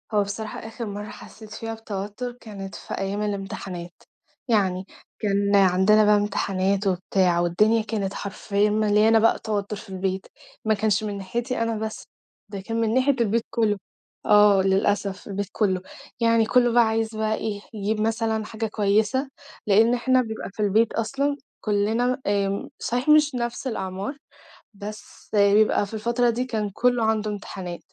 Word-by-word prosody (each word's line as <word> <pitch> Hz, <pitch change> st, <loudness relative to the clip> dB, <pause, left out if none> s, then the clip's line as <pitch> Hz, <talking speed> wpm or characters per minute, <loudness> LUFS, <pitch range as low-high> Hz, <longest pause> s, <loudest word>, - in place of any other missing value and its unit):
هو 205 Hz, -1 st, +4 dB
بصراحة 210 Hz, +2 st, -5 dB
آخِر 225 Hz, +2 st, -7 dB
مرَّة 205 Hz, 0 st, -6 dB
حسّيت 215 Hz, -1 st, -12 dB
فيها 225 Hz, +1 st, -5 dB
بتوتُّر 220 Hz, +2 st, -5 dB
كانت 195 Hz, -3 st, -8 dB
في -, -, -8 dB
أيام 195 Hz, +2 st, -2 dB
الإمتحانات، 195 Hz, -4 st, -5 dB, 0.5 s
يعني، 190 Hz, -5 st, +1 dB, 0.3 s
كان 200 Hz, -1 st, +1 dB
عندنا 195 Hz, +2 st, +5 dB
بقى 210 Hz, 0 st, +5 dB
إمتحانات 200 Hz, -1 st, 0 dB
وبتاع 180 Hz, -1 st, +1 dB
والدنيا 210 Hz, +7 st, +3 dB
كانت 210 Hz, -3 st, -3 dB
حرفيًا 200 Hz, +1 st, -1 dB
مليانة 215 Hz, +1 st, +4 dB
بقى 225 Hz, +1 st, +3 dB
توتُّر 210 Hz, -1 st, -3 dB
في 215 Hz, +1 st, -11 dB
البيت، 190 Hz, 0 st, -3 dB, 0.4 s
ما 220 Hz, -, +3 dB
كانش 215 Hz, 0 st, +1 dB
من 205 Hz, -1 st, -3 dB
ناحيتي 235 Hz, +6 st, -3 dB
أنا 230 Hz, -1 st, -1 dB
بس، 220 Hz, 0 st, -5 dB, 0.4 s
ده 200 Hz, -2 st, -6 dB
كان 225 Hz, +4 st, -2 dB
من 225 Hz, -1 st, +1 dB
ناحية 260 Hz, +2 st, +3 dB
البيت 230 Hz, +1 st, +1 dB
كلّه، 220 Hz, -3 st, +1 dB, 0.5 s
آه، 205 Hz, -2 st, +6 dB
للأسف 195 Hz, 0 st, 0 dB
البيت 200 Hz, 0 st, -3 dB
كلّه 190 Hz, -4 st, 0 dB, 0.4 s
يعني 230 Hz, -1 st, +3 dB
كلّه 240 Hz, +1 st, +3 dB
بقى 240 Hz, 0 st, +5 dB
عايز 220 Hz, 0 st, -1 dB
بقى 215 Hz, 0 st, 0 dB
إيه، 205 Hz, -2 st, -4 dB
يجيب 215 Hz, 0 st, -2 dB
مثلًا 220 Hz, 0 st, 0 dB
حاجة 225 Hz, +1 st, -4 dB
كويسة 215 Hz, +6 st, +1 dB, 0.4 s
لإن 220 Hz, +4 st, +5 dB
إحنا 255 Hz, +1 st, +3 dB
بيبقى 220 Hz, -2 st, -5 dB
في 205 Hz, -, -23 dB
البيت 215 Hz, +2 st, +2 dB
أصلًا 275 Hz, +5 st, -1 dB, 0.2 s
كلّنا 225 Hz, +5 st, 0 dB
آمم، 200 Hz, -1 st, 0 dB
صحيح 245 Hz, +5 st, -1 dB
مش 300 Hz, -2 st, +5 dB
نفْس 240 Hz, +2 st, -3 dB
الأعمار 195 Hz, +4 st, -4 dB, 0.6 s
بس 210 Hz, +1 st, -10 dB
بيبقى 205 Hz, 0 st, +4 dB
في 200 Hz, -, -13 dB
الفترة 235 Hz, +3 st, +1 dB
دي 245 Hz, +2 st, -2 dB
كان 220 Hz, -4 st, -2 dB
كلّه 245 Hz, +1 st, +2 dB
عنده 215 Hz, -1 st, 0 dB
امتحانات، 190 Hz, -4 st, -6 dB
210 Hz, 155 wpm, -24 LUFS, 200-225 Hz, 0.6 s, آه